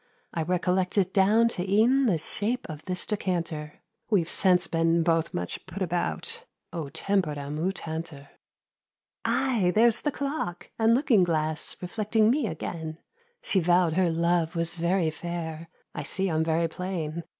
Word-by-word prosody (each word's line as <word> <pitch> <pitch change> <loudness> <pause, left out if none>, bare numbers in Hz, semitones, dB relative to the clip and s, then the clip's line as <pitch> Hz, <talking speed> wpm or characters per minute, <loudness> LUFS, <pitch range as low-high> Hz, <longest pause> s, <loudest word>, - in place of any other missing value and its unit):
I 165 - -1
recollect 180 +3 0
it 190 -1 +2
down 215 +4 +5
to 185 -3 -3
e'en 245 +6 +4
The 185 -7 +3
shape 210 +10 -3
of 155 -3 -8
this 180 -1 -2
decanter. 170 -7 -3 0.3
We've 180 -7 +2
since 180 -3 +4
been 165 0 +2
both 165 0 +1
much 90 0 -4
put 185 +1 -4
about— 185 - -2 0.3
"O 160 -5 -4
tempora 155 -3 -1
mutantur!" 160 -3 -4 1.0
Aye, 230 -9 +2
there's 230 +1 +4
the 295 - 0
clock, 280 - -4
and 225 +1 +5
looking 245 -7 +4
glass 155 -2 0
Reflecting 215 +3 +2
me 270 -3 +1
again; 160 -2 -5 0.5
She 195 - +1
vow'd 175 -1 +3
her 180 0 +2
Love 170 0 +1
was 165 0 0
very 170 -1 +1
fair— 165 -1 -5 0.2
I - - -4
see 190 -2 0
I'm 160 0 +1
very 165 +1 +1
plain. 170 -2 -4
175 Hz, 150 wpm, -27 LUFS, 160-200 Hz, 1.0 s, down